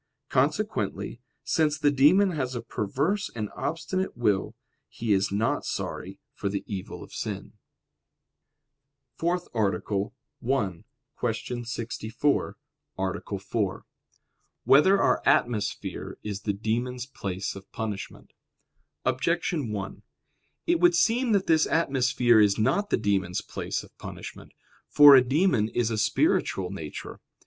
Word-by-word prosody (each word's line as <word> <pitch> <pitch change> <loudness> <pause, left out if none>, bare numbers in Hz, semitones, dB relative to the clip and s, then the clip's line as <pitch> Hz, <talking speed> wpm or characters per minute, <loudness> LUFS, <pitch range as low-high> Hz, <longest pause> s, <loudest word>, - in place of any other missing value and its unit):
Consequently, 120 - -1 0.2
since 155 -2 +1
the 145 -1 +3
demon 170 +9 +5
has 130 -6 -2
a 120 - -4
perverse 145 - -1
and 105 -2 -4
obstinate 180 +1 -3
will, 105 -5 +1 0.3
he 115 -2 -1
is 95 0 +1
not 110 +3 0
sorry - - -4 0.2
for 100 - -3
the 100 0 -3
evil 95 -3 -6
of - - -14
sin. - - -4 1.7
_______________________ - - -32
FOURTH 175 +1 0
ARTICLE 100 -2 0 0.3
[I, 110 -8 -1 0.4
Q. 120 +1 -3
64, 120 +3 -1 0.4
Art. 95 +1 -3
4] 100 -1 -2 0.8
Whether 190 +8 +6
Our - - +3
Atmosphere 115 -4 0
Is 100 -2 -4
the 100 0 -1
Demons' 120 +4 -2
Place 100 -8 -4
of 95 -1 -12
Punishment? 105 -3 -6 0.7
Objection 145 0 0
1: 100 -2 -5 0.6
It 340 0 +2
would 350 0 +5
seem 240 -3 +2
that 195 -2 +2
this 160 -1 +3
atmosphere 130 -6 +3
is 105 -2 +4
not 135 - +1
the - - +2
demons' 95 -4 0
place - - -4
of - - -17
punishment. - - -9 0.3
For 145 -1 +9
a 130 - +8
demon 135 - +2
is 115 -1 0
a 110 - -1
spiritual 95 -3 +1
nature. 80 -6 -7
120 Hz, 125 wpm, -27 LUFS, 100-150 Hz, 1.7 s, For